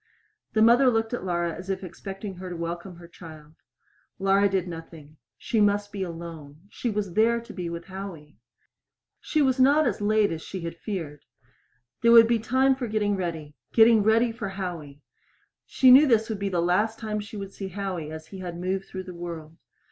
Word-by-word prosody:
The 220 Hz, -, +4 dB
mother 245 Hz, +3 st, +6 dB
looked 225 Hz, -1 st, 0 dB
at 245 Hz, -, -3 dB
Laura, 175 Hz, -2 st, -1 dB
as 185 Hz, +4 st, -9 dB
if 195 Hz, 0 st, -2 dB
expecting 195 Hz, +2 st, -7 dB
her 185 Hz, 0 st, -7 dB
to 175 Hz, -, -6 dB
welcome 170 Hz, +2 st, -5 dB
her 170 Hz, 0 st, -13 dB
child. 155 Hz, -3 st, -13 dB, 0.6 s
Laura 195 Hz, +1 st, +3 dB
did 190 Hz, -2 st, -1 dB
nothing. 165 Hz, -3 st, -10 dB, 0.2 s
She 225 Hz, -, 0 dB
must 205 Hz, 0 st, +2 dB
be 200 Hz, -2 st, -5 dB
alone. 165 Hz, -4 st, -7 dB
She 240 Hz, -, -3 dB
was 205 Hz, -4 st, -3 dB
there 230 Hz, +4 st, +3 dB
to 235 Hz, -1 st, -11 dB
be 180 Hz, -3 st, -4 dB
with 170 Hz, 0 st, -6 dB
Howie. 185 Hz, -6 st, -9 dB, 0.8 s
She 305 Hz, -2 st, 0 dB
was 260 Hz, -1 st, +1 dB
not 285 Hz, +4 st, +5 dB
as 210 Hz, -5 st, -1 dB
late 210 Hz, -1 st, +2 dB
as 160 Hz, -1 st, -4 dB
she 190 Hz, +2 st, -7 dB
had 165 Hz, 0 st, -5 dB
feared. 165 Hz, -7 st, -6 dB, 0.8 s
There 235 Hz, 0 st, +5 dB
would 230 Hz, -1 st, +9 dB
be 235 Hz, -1 st, +2 dB
time 260 Hz, +4 st, +2 dB
for 255 Hz, -2 st, -4 dB
getting 210 Hz, -2 st, 0 dB
ready 165 Hz, -5 st, -4 dB, 0.2 s
getting 225 Hz, -1 st, +6 dB
ready 225 Hz, +3 st, +3 dB
for 215 Hz, -3 st, -5 dB
Howie! 170 Hz, -7 st, -6 dB, 0.6 s
She 260 Hz, -1 st, +5 dB
knew 280 Hz, +4 st, +8 dB
this 225 Hz, -3 st, +2 dB
would 215 Hz, -3 st, -3 dB
be 200 Hz, 0 st, -1 dB
the 175 Hz, -3 st, 0 dB
last 210 Hz, +6 st, +1 dB
time 215 Hz, -2 st, -3 dB
she 210 Hz, +1 st, -8 dB
would 195 Hz, -1 st, -7 dB
see 195 Hz, -, -6 dB
Howie 185 Hz, -5 st, -5 dB
as 160 Hz, 0 st, -8 dB
he 195 Hz, -, -9 dB
had 175 Hz, -2 st, -6 dB
moved 190 Hz, +2 st, -2 dB
through 190 Hz, 0 st, -7 dB
the 185 Hz, -1 st, -9 dB
world. 165 Hz, -2 st, -8 dB
195 Hz, 200 wpm, -26 LUFS, 170-220 Hz, 0.8 s, would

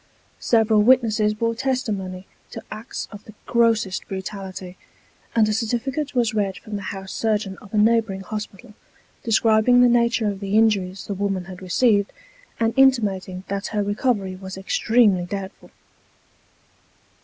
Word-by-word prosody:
Several 220 Hz, -2 st, +3 dB
witnesses 220 Hz, -3 st, +3 dB
bore 230 Hz, +1 st, 0 dB
testimony 215 Hz, -7 st, -3 dB, 0.2 s
to -, -, -8 dB
acts 215 Hz, +3 st, -6 dB
of 205 Hz, -1 st, -10 dB
the 215 Hz, -, -14 dB
grossest 225 Hz, -5 st, +1 dB
brutality; 190 Hz, -1 st, -7 dB, 0.6 s
and 220 Hz, -2 st, +4 dB
a 215 Hz, -, 0 dB
certificate 250 Hz, +6 st, -2 dB
was 235 Hz, -3 st, +1 dB
read 200 Hz, -3 st, -1 dB
from 215 Hz, -, -8 dB
the 200 Hz, -, -4 dB
house 190 Hz, -1 st, -7 dB
surgeon 210 Hz, -3 st, -1 dB
of 205 Hz, -, -15 dB
a 215 Hz, -, -1 dB
neighbouring 220 Hz, -2 st, +2 dB
hospital, 210 Hz, 0 st, -7 dB, 0.5 s
describing 225 Hz, +2 st, +4 dB
the 250 Hz, -, +7 dB
nature 235 Hz, -2 st, +2 dB
of 200 Hz, -2 st, -3 dB
the 200 Hz, +1 st, 0 dB
injuries 200 Hz, -4 st, +1 dB
the 205 Hz, -, -4 dB
woman 195 Hz, -2 st, -2 dB
had 185 Hz, 0 st, -10 dB
received, 205 Hz, +2 st, +2 dB, 0.5 s
and 225 Hz, 0 st, +1 dB
intimating 205 Hz, -9 st, +2 dB
that 200 Hz, 0 st, -3 dB
her 210 Hz, -1 st, -1 dB
recovery 205 Hz, -2 st, -1 dB
was 190 Hz, 0 st, -8 dB
extremely 200 Hz, -1 st, +2 dB
doubtful. 195 Hz, 0 st, -7 dB
210 Hz, 145 wpm, -22 LUFS, 195-230 Hz, 0.6 s, the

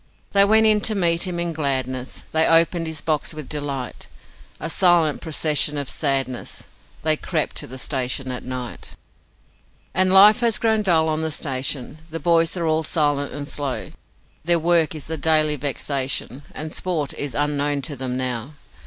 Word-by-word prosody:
They 200 Hz, 0 st, +5 dB
went 220 Hz, +2 st, +4 dB
in 215 Hz, -1 st, +4 dB
to 215 Hz, -, +2 dB
meet 170 Hz, -1 st, +2 dB
him 175 Hz, -1 st, -3 dB
in 170 Hz, -1 st, -1 dB
gladness, 130 Hz, -4 st, -3 dB
They 160 Hz, 0 st, +3 dB
opened 165 Hz, 0 st, +3 dB
his 160 Hz, -1 st, -5 dB
box 155 Hz, 0 st, -1 dB
with 155 Hz, -3 st, -7 dB
delight 140 Hz, -4 st, -5 dB, 0.5 s
A -, -, -3 dB
silent 170 Hz, -3 st, +3 dB
procession 150 Hz, -1 st, +1 dB
of 140 Hz, -2 st, -2 dB
sadness 135 Hz, -4 st, -1 dB, 0.4 s
They 155 Hz, 0 st, +4 dB
crept 155 Hz, 0 st, -2 dB
to -, -, -4 dB
the 130 Hz, -, -9 dB
station 130 Hz, 0 st, -2 dB
at 125 Hz, -, -5 dB
night. 125 Hz, -1 st, -6 dB, 1.0 s
And 185 Hz, +1 st, +3 dB
life 205 Hz, +3 st, +8 dB
has 235 Hz, -2 st, +2 dB
grown 220 Hz, -1 st, +1 dB
dull 165 Hz, -5 st, +2 dB
on 155 Hz, 0 st, 0 dB
the 160 Hz, -, 0 dB
station, 135 Hz, -1 st, -2 dB
The 165 Hz, +1 st, -5 dB
boys 165 Hz, +2 st, +2 dB
are 170 Hz, -, -2 dB
all 160 Hz, 0 st, +1 dB
silent 145 Hz, -3 st, 0 dB
and 145 Hz, 0 st, -6 dB
slow; 145 Hz, -3 st, -3 dB, 0.5 s
Their 170 Hz, +1 st, +3 dB
work 165 Hz, -2 st, +2 dB
is 155 Hz, -, -6 dB
a 160 Hz, 0 st, -3 dB
daily 155 Hz, -1 st, +3 dB
vexation, 135 Hz, -1 st, -3 dB
And 155 Hz, 0 st, -6 dB
sport 165 Hz, -6 st, -2 dB
is 140 Hz, -5 st, -4 dB
unknown 145 Hz, -1 st, 0 dB
to 150 Hz, -, -4 dB
them 130 Hz, -1 st, -3 dB
now. 125 Hz, +1 st, -3 dB
155 Hz, 170 wpm, -22 LUFS, 140-170 Hz, 1.0 s, life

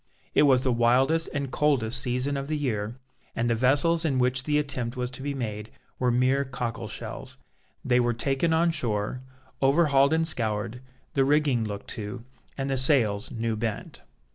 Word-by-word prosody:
It 150 Hz, -, +5 dB
was 130 Hz, -1 st, +4 dB
the 130 Hz, -, +2 dB
wildest 130 Hz, +8 st, +3 dB
and 140 Hz, -3 st, -3 dB
coldest 130 Hz, -6 st, +2 dB
season 125 Hz, +3 st, -1 dB
of 140 Hz, 0 st, -4 dB
the 155 Hz, 0 st, -1 dB
year, 115 Hz, -6 st, -2 dB, 0.4 s
and 115 Hz, -, 0 dB
the 120 Hz, -, +2 dB
vessels 140 Hz, +8 st, +3 dB
in 145 Hz, -5 st, 0 dB
which 125 Hz, +1 st, +1 dB
the 150 Hz, -1 st, +1 dB
attempt 130 Hz, -4 st, -2 dB
was 125 Hz, 0 st, -2 dB
to 125 Hz, -, -8 dB
be 140 Hz, +1 st, -3 dB
made 110 Hz, -4 st, -5 dB, 0.3 s
were 125 Hz, -, +2 dB
mere 130 Hz, +3 st, +2 dB
cockle 125 Hz, -3 st, -4 dB
shells. -, -, -6 dB, 0.5 s
They 125 Hz, -1 st, +3 dB
were 120 Hz, -1 st, +1 dB
taken 135 Hz, +7 st, 0 dB
on 165 Hz, +1 st, +3 dB
shore, 120 Hz, -4 st, -1 dB, 0.4 s
overhauled 140 Hz, 0 st, +4 dB
and 160 Hz, 0 st, +1 dB
scoured, 110 Hz, -3 st, -2 dB, 0.3 s
the 135 Hz, -, +3 dB
rigging 140 Hz, -4 st, +2 dB
looked 100 Hz, -1 st, -6 dB
to, 110 Hz, +2 st, -6 dB, 0.3 s
and 135 Hz, 0 st, -2 dB
the 135 Hz, -1 st, 0 dB
sails 120 Hz, -7 st, +2 dB
new 115 Hz, -1 st, -2 dB
bent. 110 Hz, -1 st, -4 dB
130 Hz, 175 wpm, -26 LUFS, 115-140 Hz, 0.5 s, It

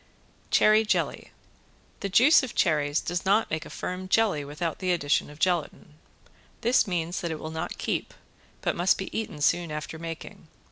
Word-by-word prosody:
~CHERRY 215 Hz, +1 st, +5 dB
JELLY~ 215 Hz, -, -1 dB, 0.7 s
The 200 Hz, -, -3 dB
juice 255 Hz, -, +6 dB
of 260 Hz, -4 st, -6 dB
cherries 150 Hz, -4 st, +2 dB
does 175 Hz, 0 st, -3 dB
not 205 Hz, +4 st, +2 dB
make 155 Hz, 0 st, -3 dB
a -, -, -12 dB
firm 185 Hz, +1 st, -5 dB
jelly 195 Hz, -7 st, +2 dB
without 150 Hz, +3 st, -4 dB
the 185 Hz, -1 st, 0 dB
addition 145 Hz, -5 st, +1 dB
of 150 Hz, -, -12 dB
gelatin. 170 Hz, -3 st, -1 dB, 0.7 s
This 240 Hz, -1 st, +3 dB
means 175 Hz, -1 st, -2 dB
that 170 Hz, -, -2 dB
it 160 Hz, -1 st, -4 dB
will 155 Hz, -, -6 dB
not 160 Hz, 0 st, -4 dB
keep, -, -, -3 dB, 0.5 s
but -, -, 0 dB
must 175 Hz, +2 st, +3 dB
be 190 Hz, -, -6 dB
eaten 210 Hz, -9 st, -4 dB
soon 170 Hz, +2 st, +2 dB
after 150 Hz, +1 st, -6 dB
making. 165 Hz, -1 st, -8 dB
175 Hz, 175 wpm, -27 LUFS, 155-195 Hz, 0.7 s, juice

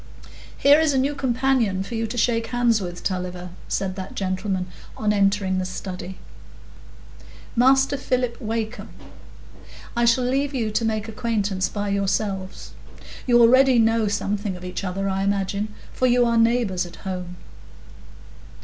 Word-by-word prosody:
"Here 285 Hz, +2 st, +6 dB
is 315 Hz, -2 st, +2 dB
a -, -, +1 dB
new 275 Hz, +3 st, +1 dB
companion 250 Hz, -7 st, +1 dB
for 215 Hz, -, -8 dB
you 225 Hz, 0 st, -1 dB
to 235 Hz, +3 st, -6 dB
shake 230 Hz, 0 st, +1 dB
hands 240 Hz, -3 st, +2 dB
with, 175 Hz, -1 st, -6 dB
Tulliver," 180 Hz, -1 st, -3 dB, 0.2 s
said 190 Hz, -1 st, -2 dB
that 190 Hz, 0 st, -7 dB
gentleman 185 Hz, -1 st, -2 dB, 0.3 s
on 210 Hz, -1 st, +1 dB
entering 195 Hz, -2 st, +1 dB
the -, -, -1 dB
study,—"Master 230 Hz, +8 st, -3 dB
Philip 250 Hz, -3 st, -1 dB
Wakem. 225 Hz, 0 st, -4 dB, 1.1 s
I 235 Hz, 0 st, +2 dB
shall 235 Hz, +2 st, +3 dB
leave 275 Hz, +3 st, 0 dB
you 225 Hz, -4 st, -1 dB
to 220 Hz, -, 0 dB
make 220 Hz, -1 st, -1 dB
acquaintance 210 Hz, -4 st, -1 dB
by 205 Hz, -1 st, -3 dB
yourselves. 195 Hz, -1 st, -2 dB, 0.6 s
You 240 Hz, -1 st, +5 dB
already 255 Hz, +2 st, +6 dB
know 225 Hz, -1 st, +3 dB
something 205 Hz, -1 st, -2 dB
of 180 Hz, 0 st, -9 dB
each 180 Hz, +2 st, -5 dB
other, 195 Hz, +1 st, -2 dB
I 190 Hz, 0 st, -1 dB
imagine; 200 Hz, +1 st, -1 dB, 0.2 s
for 255 Hz, -, +1 dB
you 245 Hz, 0 st, +4 dB
are 235 Hz, 0 st, +1 dB
neighbours 230 Hz, -6 st, +2 dB
at 175 Hz, -, -12 dB
home." 180 Hz, -2 st, -5 dB
215 Hz, 145 wpm, -23 LUFS, 190-240 Hz, 1.1 s, Here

